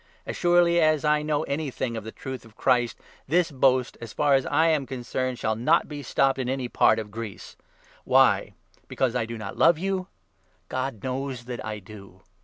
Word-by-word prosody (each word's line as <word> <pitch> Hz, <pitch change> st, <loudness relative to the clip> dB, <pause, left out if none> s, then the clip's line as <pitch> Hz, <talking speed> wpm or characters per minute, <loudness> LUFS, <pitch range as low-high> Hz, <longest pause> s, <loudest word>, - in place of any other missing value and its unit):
As -, -, -5 dB
surely 175 Hz, -1 st, +4 dB
as 155 Hz, -1 st, +3 dB
I 150 Hz, 0 st, +3 dB
know 150 Hz, -1 st, 0 dB
anything 140 Hz, -4 st, -3 dB
10 -, -, -4 dB
of 110 Hz, -, -5 dB
the 110 Hz, -, -7 dB
Truth 130 Hz, 0 st, -7 dB
of 115 Hz, -1 st, -18 dB
Christ, 120 Hz, -1 st, +2 dB, 0.3 s
this 170 Hz, +3 st, +2 dB
boast, 130 Hz, -2 st, +2 dB
as 115 Hz, -1 st, -8 dB
far 145 Hz, -1 st, +2 dB
as 135 Hz, -1 st, +2 dB
I 160 Hz, +3 st, +3 dB
am 150 Hz, -4 st, +1 dB
concerned, 130 Hz, 0 st, -3 dB
shall 110 Hz, -1 st, -1 dB
not 155 Hz, +10 st, +2 dB
be 145 Hz, -1 st, -7 dB
stopped 135 Hz, +1 st, +1 dB
in 125 Hz, -1 st, -2 dB
any 130 Hz, -1 st, -2 dB
part -, -, +3 dB
of 110 Hz, -2 st, -5 dB
Greece. 110 Hz, -2 st, -8 dB, 0.5 s
Why? -, -, +3 dB, 0.3 s
Because 130 Hz, -3 st, 0 dB
1 125 Hz, -, 0 dB
1 -, -, 0 dB
I -, -, -1 dB
do 115 Hz, 0 st, -6 dB
not 110 Hz, -3 st, -7 dB
love 170 Hz, -, +5 dB
you? 190 Hz, +1 st, -2 dB, 0.6 s
God 130 Hz, -5 st, -3 dB
knows 130 Hz, -1 st, -4 dB
that 120 Hz, -2 st, -6 dB
I 110 Hz, -1 st, -4 dB
do 100 Hz, -2 st, -13 dB
130 Hz, 205 wpm, -25 LUFS, 115-150 Hz, 0.6 s, love